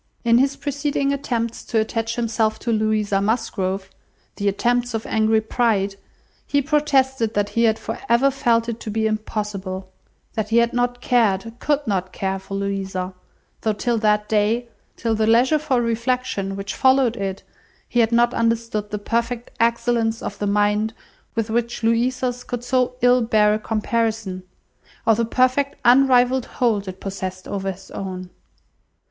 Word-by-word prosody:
In 235 0 +4
his 275 +1 +2
preceding 285 -1 -1
attempts 235 -4 -2
to 225 - +1
attach 225 +1 -1
himself 225 -2 0
to 235 - -1
Louisa 215 -2 +1
Musgrove 195 -3 -1 0.5
(the 200 - -1
attempts 240 +4 +1
of 220 - -3
angry 220 0 +2
pride), 215 -3 +1 0.5
he 285 - +2
protested 265 -5 +1
that 205 0 +1
he 230 +3 +2
had 220 -1 +3
for - - -5
ever 250 +4 +4
felt 235 -3 +1
it 235 -1 -4
to 220 - -6
be 220 +1 0
impossible; 205 -3 -3 0.4
that 220 -2 -2
he 225 - +3
had 235 0 +3
not 245 0 0
cared, 225 -3 +1
could 290 -1 0
not 185 -3 -1
care, 190 0 -2
for 195 +1 -7
Louisa; 195 -2 -3 0.5
though 220 - +1
till 230 +2 -1
that 210 -1 +2
day, 220 +3 +1 0.3
till 230 -1 0
the 220 0 +1
leisure 250 +7 +4
for 265 -4 +1
reflection 235 -3 -1
which 195 0 -5
followed 260 -3 +3
it, 195 -3 -4 0.4
he 240 - 0
had 230 -1 +3
not 240 +1 +3
understood 230 -2 0
the 210 - -3
perfect 235 +3 -2
excellence 230 -1 +1
of - - -5
the 205 - -1
mind 210 +2 +1 0.4
with 225 -1 -1
which 235 0 -1
Louisa's 245 +2 +1
could 245 -1 -5
so 250 0 +1
ill 245 0 +5
bear 215 -2 +3
a 215 - 0
comparison, 220 -3 -1 0.6
or 225 - +5
the 230 +2 +1
perfect 255 +4 +1
unrivalled 250 0 +5
hold 215 -5 +1
it 185 0 -7
possessed 185 -1 -5
over 195 -1 -2
his 190 +1 -13
own. 185 -2 -6
225 Hz, 160 wpm, -22 LUFS, 205-245 Hz, 0.6 s, ill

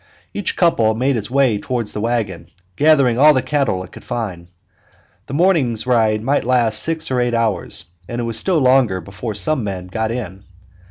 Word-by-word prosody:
Each 205 - -2
couple 115 -11 +2
made 130 +4 +1
its 105 -2 -3
way 130 -5 +2
toward 120 0 -3
the 105 - -4
wagon, 110 -6 -2 0.3
gathering 140 -5 +3
all 150 +1 +7
the 130 - +1
cattle 135 -11 0
it 90 - -13
could - - -12
find. 95 -7 -5 0.8
The 135 - -5
morning's 145 - +2
ride 110 -4 +2
might 140 +4 +1
last 120 -3 +1
six 160 -3 -2
or 125 -1 +1
eight 120 -1 0
hours, 110 -6 -1 0.2
and 120 - -4
it - - -1
was 115 -1 -3
still 185 +4 +1
longer 130 -8 +3
before 100 +5 -6
some 135 +10 0
of 115 - -4
the 100 - -2
men 90 -1 -7
got 110 +3 -2
in. 100 -5 -5
120 Hz, 200 wpm, -19 LUFS, 105-135 Hz, 0.8 s, all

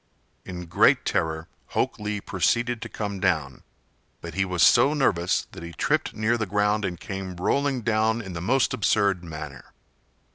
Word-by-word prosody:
In 90 -1 -6
great 85 - +4
terror 80 0 -1 0.3
Hok - - 0
Lee 105 0 -3
proceeded 115 +5 0
to 115 - -6
come 100 -3 -4
down; 80 -8 0 0.6
but 85 -2 -8
he 95 +2 +1
was 90 -2 +1
so 135 +5 +6
nervous 90 - +1
that - - -10
he 85 0 -8
tripped - - 0
near 110 +2 +1
the 110 - -1
ground 105 +1 +1
and 90 -1 -4
came 95 -2 -6
rolling 135 +8 0
down 110 0 +1
in 95 -5 -7
the 85 - -5
most 130 +8 +2
absurd 100 -3 +2
manner. 75 -5 -9
100 Hz, 170 wpm, -25 LUFS, 85-110 Hz, 0.6 s, so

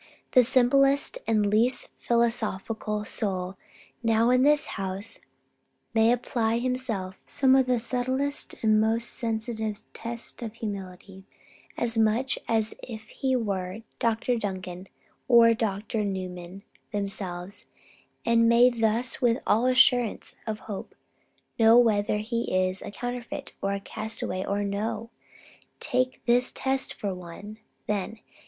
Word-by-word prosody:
The 255 - +7
simplest 275 - +3
and 215 -2 +3
the - - +1
least 230 +5 +2
philosophical 220 -2 -1
soul 190 -3 -3 0.5
now 230 +1 +3
in 255 0 +4
this 295 +2 +4 0.2
house 195 +3 -2 0.7
may 225 0 +5
apply 235 -2 0
to - - +1
himself 230 -8 -2
some 265 -2 +3
of 265 -1 +4
the 250 -1 +3
subtlest 260 +4 -1
and 215 -1 +4
most 225 +2 +1
sensitive 220 -2 -2
tests 235 +2 -3
of 230 -2 -6
humility, 195 -3 -7 0.5
as 230 -1 +1
much 225 +4 +2
as 220 -1 +1
if 220 -3 -9
he 265 -1 -1
were 200 -3 -2 0.2
Dr. 230 +1 +1
Duncan 185 -3 -5 0.4
or 235 -2 +7
Dr. 215 0 -2
Newman 185 -1 -5 0.3
themselves; 195 -2 -4 0.6
and 230 0 +4
may 240 +2 +6
thus 230 +2 0
with 240 -1 +3
all 225 +4 +3
assurance 250 -2 +3
of 215 -1 -3
hope 205 -3 -7 0.6
know 225 +1 +7
whether 210 -3 +3
he 230 +2 -2
is 185 0 +1
a - - -6
counterfeit 245 +2 -5
and 195 0 0
a - - -3
castaway 210 -2 -4
or 200 +1 -1
no. 210 +3 -3 0.7
Take 255 +1 -1
this 245 +1 +3
test 265 0 -1
for 200 -2 -3
one, 180 +4 -9 0.3
then. 210 +1 -2
225 Hz, 130 wpm, -27 LUFS, 200-245 Hz, 0.7 s, The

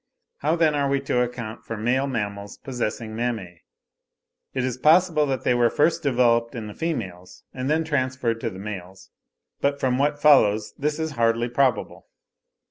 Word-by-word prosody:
How 155 +3 +1
then 160 -3 +3
are 140 -1 0
we 140 0 +2
to 125 -2 0
account 120 -2 -4
for 115 - -6
male 125 +5 +1
mammals 100 -5 -4
possessing 115 -3 -4
mammae? 110 -8 -3 0.9
It 130 - -2
is 130 -2 -1
possible 160 0 +4
that 135 -2 -2
they - - +3
were 120 -1 +3
first 160 +3 +2
developed 120 -3 +2
in 115 -2 -5
the 105 - -8
females 95 - -5
and 130 +1 -3
then 160 +2 +2
transferred 130 -6 -1
to 115 - -1
the 95 - -10
males, 95 -2 -8 0.5
but 140 0 0
from 130 -1 +1
what 145 +1 +1
follows 110 -8 +4
this 150 +1 -1
is 160 -1 -2
hardly 115 -2 +1
probable. 125 -2 0
125 Hz, 170 wpm, -24 LUFS, 115-140 Hz, 0.9 s, possible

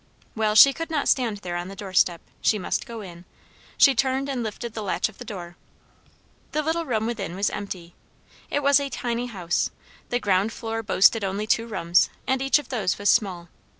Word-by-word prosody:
Well, 215 -1 +1
she 275 +5 +9
could 330 +4 -5
not 305 -3 -1
stand 235 -6 +2
there 175 -1 -4
on 175 +1 -3
the 195 - -9
door 195 -1 -8
step. 175 -2 +3 0.2
She 215 - +3
must 200 - -2
go 230 -2 -7
in. 175 -3 -10 0.5
She 275 - +7
turned 265 +2 0
and 260 -3 -2
lifted 225 +1 -5
the 220 - -5
latch 205 +1 0
of 215 - -18
the - - -6
door. 180 -6 -8 1.0
The 305 - 0
little 325 +2 -1
room 220 -3 0
within 210 -6 -4
was 200 +2 0
empty. 185 -4 -6 0.6
It 290 - -1
was 280 0 +5
a 280 -1 -3
tiny 240 -1 -3
house; 180 -7 -1 0.4
the 245 - +1
ground 200 0 +1
floor 225 0 -4
boasted 210 +1 +4
only 195 +2 -2
two 230 +1 +1
rooms, 175 -4 +2 0.2
and 265 0 0
each 270 +2 +4
of 295 -4 -7
those 210 -8 -1
was 205 0 +3
small. 180 -7 0
220 Hz, 205 wpm, -24 LUFS, 190-250 Hz, 1.0 s, she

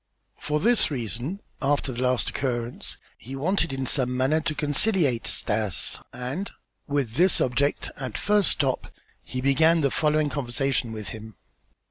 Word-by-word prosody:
For 150 +1 0
this 235 +5 +3
reason, 130 - -3 0.2
after 140 -1 +1
the 120 0 -4
last 125 -1 +1
occurrence 120 -3 -3 0.2
he 130 +4 -8
wanted 165 +3 +1
in 135 0 -2
some 125 -2 +1
manner 140 +5 +2
to 155 0 -2
conciliate 145 - +1
Stas 105 -3 0
and, 135 +11 -4 0.4
with 140 -5 -1
this 185 +2 +4
object, 135 +3 +1
at 130 -5 -4
the - - -3
first 205 -2 +3
stop, 135 -4 0 0.3
he 130 - -4
began 160 +5 +4
the 140 -2 +2
following 150 -1 +2
conversation 135 -3 -1
with 110 -2 -5
him. 110 -1 -9
135 Hz, 150 wpm, -26 LUFS, 125-155 Hz, 0.4 s, this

